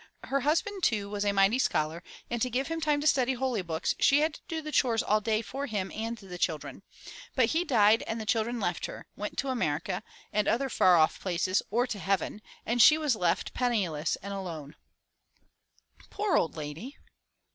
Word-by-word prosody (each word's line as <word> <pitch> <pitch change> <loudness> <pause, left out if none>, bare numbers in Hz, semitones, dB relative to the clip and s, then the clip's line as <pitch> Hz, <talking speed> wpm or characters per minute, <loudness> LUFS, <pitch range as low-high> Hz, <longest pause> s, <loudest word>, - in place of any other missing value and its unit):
Her 275 - 0
husband 340 - 0
too 205 - 0
was 205 -1 -2
a 205 - +2
mighty 200 +5 +3
scholar 155 -7 0 0.3
and 235 -1 -3
to 255 - +1
give 265 +5 -1
him 330 0 -3
time 300 -2 +1
to - - -4
study 265 -4 +3
holy 250 -4 -1
books, 165 -2 -1
she 280 +2 +5
had 310 0 +1
to 320 -1 -3
do 305 - -5
chores 235 -6 +2
all 215 +1 +2
day 220 +1 0
for 275 +6 -5
him 200 -4 -3
and 225 +2 -4
the 185 -4 -10
children. 160 -4 -2 0.5
But 250 -3 +3
he 330 +6 +1
died 225 -7 +4
and 225 - -3
the 220 - -5
children 230 +2 0
left - - -2
her - - -9
— - - -45
went - - -5
to 275 - -1
America 160 - -1 0.3
and 210 -1 +1
other 270 +3 +1
far 180 -6 +5
off 155 -1 +3
places 185 +1 0
or 240 +4 +2
to 225 -5 -5
heaven, 195 +3 -1 0.2
and 235 +1 +2
she 305 +6 +8
was 300 -6 +1
left 175 -5 0
penniless 190 -11 0
and 200 0 -5
alone.*' 165 -7 -6 1.3
"Poor 410 -1 0
ould 165 - +1
lady!" 155 - -7
225 Hz, 200 wpm, -29 LUFS, 190-265 Hz, 1.3 s, she